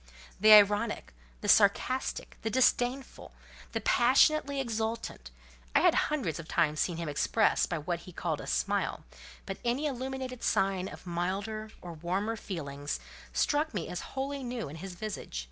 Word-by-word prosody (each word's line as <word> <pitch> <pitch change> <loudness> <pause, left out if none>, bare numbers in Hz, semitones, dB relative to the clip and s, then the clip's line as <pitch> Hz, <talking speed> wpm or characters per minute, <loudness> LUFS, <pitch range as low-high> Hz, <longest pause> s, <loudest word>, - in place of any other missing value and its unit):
The 215 0 +6
ironic, 210 - +5 0.3
the - - -4
sarcastic, 220 +5 +2
the 220 - -1
disdainful, 255 +2 +1 0.4
the - - -2
passionately 280 +3 +4
exultant, 225 - -3 0.5
I - - +6
had - - +5
hundreds 260 - 0
of 165 - -8
times 155 -3 +1
seen 175 -3 0
him 165 -1 -4
express 205 +9 +2
by 165 - -2
what 170 +3 -3
he 180 - -12
called 165 -3 -3
a - - -9
smile, - - -1 0.4
but - - -5
any 245 +5 0
illuminated 260 -2 -4
sign 190 -1 +1
of - - -10
milder 195 +5 -3
or 175 -1 -7
warmer 185 +7 -2
feelings 145 -9 -5 0.3
struck 300 -2 +1
me 175 - -2
as 180 - -4 0.2
wholly 275 +1 -2
new 240 - -4
in 150 - -8
his 185 +2 -7
visage. 200 - -5
210 Hz, 155 wpm, -30 LUFS, 170-250 Hz, 0.5 s, The